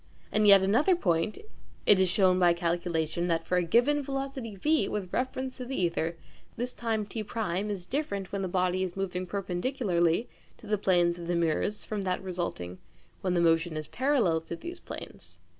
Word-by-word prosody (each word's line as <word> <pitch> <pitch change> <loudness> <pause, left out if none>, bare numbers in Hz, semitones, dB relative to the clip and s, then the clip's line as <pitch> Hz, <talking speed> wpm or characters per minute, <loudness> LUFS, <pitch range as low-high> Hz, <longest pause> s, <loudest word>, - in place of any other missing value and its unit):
And 215 0 +3
yet 200 -1 +8
another 255 - +4
point: 170 - 0 0.5
it 200 - +6
is 185 - +3
shown 185 -1 +3
by 175 -1 +5
calculation 170 -1 -1
that 165 -2 0
for 180 - +1
a 180 - +2
given 245 - +3
velocity 270 -5 -4
v 305 +11 +2
with 190 -4 -4
reference 260 +1 -2
to 250 - -5
the 245 -9 0
ćther, 165 0 -2 0.4
this 245 +2 -3
time 225 -3 -1
T1 210 -2 -3
is 195 -4 -4
different 200 -6 -3
when 200 - -2
the 190 - -1
body 185 0 +1
is 185 0 -3
moving 185 -1 -2
perpendicularly 185 -1 0 0.3
to - - -15
the 210 -1 0
planes 175 -3 +2
of 170 - -7
the 175 - 0
mirrors 170 +5 0
from 210 -2 -3
that 185 -1 -2
resulting 170 - -4 0.4
when 185 -1 0
the 175 - +3
motion 165 -1 +2
is 155 -1 -5
parallel 240 - +1
to 165 - -6
these 345 - -7
planes. - - -9
190 Hz, 185 wpm, -29 LUFS, 175-225 Hz, 0.5 s, yet